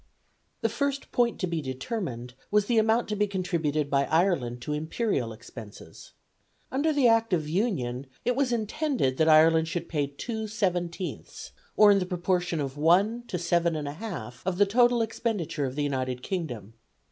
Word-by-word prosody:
The - - +2
first 275 +4 -2
point 240 -1 +1
to - - +2
be 170 -2 -2
determined 130 - -5 0.2
was 210 0 +3
the 230 0 +3
amount 225 +2 +2
to 210 - -1
be 210 0 +1
contributed 165 -6 -1
by 140 -1 +2
Ireland 160 -8 +1
to 150 - -3
imperial 155 - -1
expenses. 110 -1 -12 0.6
Under 285 +4 +1
the 285 -4 +3
Act 225 -2 +3
of 155 -4 +1
Union 140 - -1 0.2
it 245 - +2
was 270 -1 +1
intended 230 - 0
that 160 0 +3
Ireland 160 +1 +6
should 170 0 -3
pay 145 -3 -1
2/17ths, 185 - -4 0.3
or 210 -1 +8
in 200 - +4
the 180 - -2
proportion 180 -2 -1
of 140 -1 -4
1 195 +10 +3
to 180 - -3
7 170 -1 +1
1/2 145 - -6
of 180 -1 -2
the 205 - +5
total 240 +3 +3
expenditure 215 - -2
of 130 - -6
the 145 - -1
United 130 -3 -2
Kingdom. 125 - -4
175 Hz, 165 wpm, -27 LUFS, 145-220 Hz, 0.6 s, or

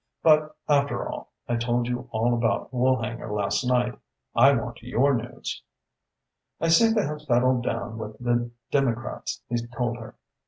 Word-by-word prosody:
But 155 -1 +4
after 140 -1 +2
all, - - -6 0.2
I 120 - 0
told 120 +1 0
you 125 +1 -3
all 115 +1 +1
about 115 0 0
Woolhanger 125 -3 0
last 105 +3 0
night. 125 -2 +1 0.3
I 135 +4 +7
want 120 -3 -2
your 125 +4 +2
news." 120 -1 -4 1.0
"I 165 - +1
seem 225 +7 +5
to 215 - +2
have 150 0 -4
settled 125 0 +2
down 115 -1 -3
with 110 -1 -6
the 120 -1 0 0.2
Democrats," 120 -4 -1
he 120 - -1
told 120 -1 -2
her. 115 -2 -10
120 Hz, 155 wpm, -26 LUFS, 115-135 Hz, 1.0 s, I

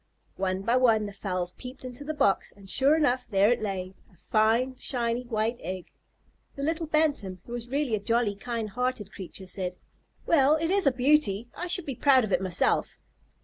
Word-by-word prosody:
One 190 0 -1
by 235 +4 +2
one 225 -4 +3
the 205 - -7
fowls 185 -3 -3
peeped 255 0 -9
into 250 +2 -6
the 310 +2 -4
box, 200 -9 +1
and 200 -1 -16
sure 275 +9 +5
enough, 255 -5 +1
there 200 +1 +4
it 245 - 0
lay, 190 -3 -4 0.2
a 180 - -24
fine, 225 +7 +1
shiny, 240 -1 -2
white 225 +1 -1
egg. 185 -1 -6 0.6
The 280 - -5
little 325 +2 -1
Bantam, 290 -12 0
who - - -12
was 240 0 -5
really 275 -2 -1
a 215 - +1
jolly, 230 +1 +1
kind 225 0 -4
hearted 250 -3 -2
creature, 190 0 -8
said, 185 -1 -3 0.5
"Well, 295 -2 +4
it 325 +2 -1
is 395 -5 +3
a - - +6
beauty. 250 -4 +2
I 355 - -5
should 360 -1 +1
be 275 - -3
proud 260 +1 +4
of 205 -3 -2
it 180 - +2
myself." 185 -2 +1
235 Hz, 195 wpm, -27 LUFS, 195-270 Hz, 0.6 s, a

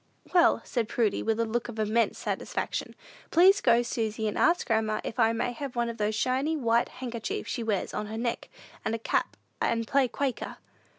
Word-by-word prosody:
"Well," 350 -2 +5
said 235 -4 -1
Prudy, 225 -4 +1
with 225 0 0
a 230 - +2
look 235 +2 -2
of 230 - -7
immense 220 +2 +1
satisfaction, - - -3 0.3
"please 385 +4 +6
go, 235 +1 +4
Susy, 220 -2 -2
and 210 - -2
ask 345 +2 +3
grandma 220 -2 +1
if 230 - -5
I 225 -1 +5
may 230 +2 -1
have 260 +1 -6
one 235 -1 0
of 230 - -6
those 210 0 0
shiny, 265 +7 +1
white 235 -3 +2
handkerchiefs 240 -3 -5
she 245 - -2
wears 215 -4 -1
on 210 - -3
her 220 +1 -5
neck, 235 0 -2 0.3
and 220 - -1
a - - -2
cap, 225 - -1 0.2
and 230 0 +1
play 275 -2 +3
Quaker." 265 +1 -3
230 Hz, 195 wpm, -28 LUFS, 220-255 Hz, 0.3 s, please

